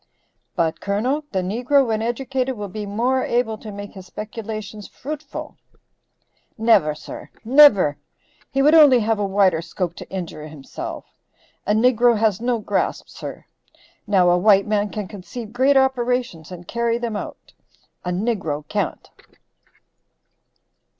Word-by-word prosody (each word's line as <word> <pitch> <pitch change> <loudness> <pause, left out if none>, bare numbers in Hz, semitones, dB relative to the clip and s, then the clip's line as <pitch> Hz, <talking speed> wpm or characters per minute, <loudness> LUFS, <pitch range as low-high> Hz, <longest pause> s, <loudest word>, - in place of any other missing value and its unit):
"But, 165 -1 0
Colonel, 250 +10 -1
the 190 -2 -1
negro 250 +8 +2
when 220 -2 -1
educated 255 +2 -2
will 205 -1 -4
be 210 +1 -6
more 245 +6 0
able 240 -2 0
to 215 - -8
make 205 0 -8
his 190 -2 -12
speculations 215 -1 -7
fruitful." 295 +1 -7 1.0
"Never, 220 -10 +3
sir, 155 - -10 0.2
never. 230 - +6 0.5
He 270 -1 +1
would 300 +2 +5
only 290 -7 +7
have 220 0 0
a 205 - 0
wider 190 -4 +3
scope 175 0 -4
to - - -9
injure 165 -5 -6
himself. 150 -3 -8 0.6
A 210 - +3
niggro 240 0 +4
has 215 -2 +1
no 240 0 +1
grasp, 215 - -2
sir. - - -8 0.6
Now, 185 -3 +4
a 175 - +3
white 200 0 +5
man 210 -1 0
can 210 -1 -5
conceive 210 +4 -9
great 270 +3 +4
operations, 245 - 0
and 175 -1 -10
carry 235 0 0
them 235 -2 -3
out; - - -7 0.5
a 180 - -3
niggro 180 -7 -2
can't." - - -3
215 Hz, 140 wpm, -22 LUFS, 190-245 Hz, 1.0 s, only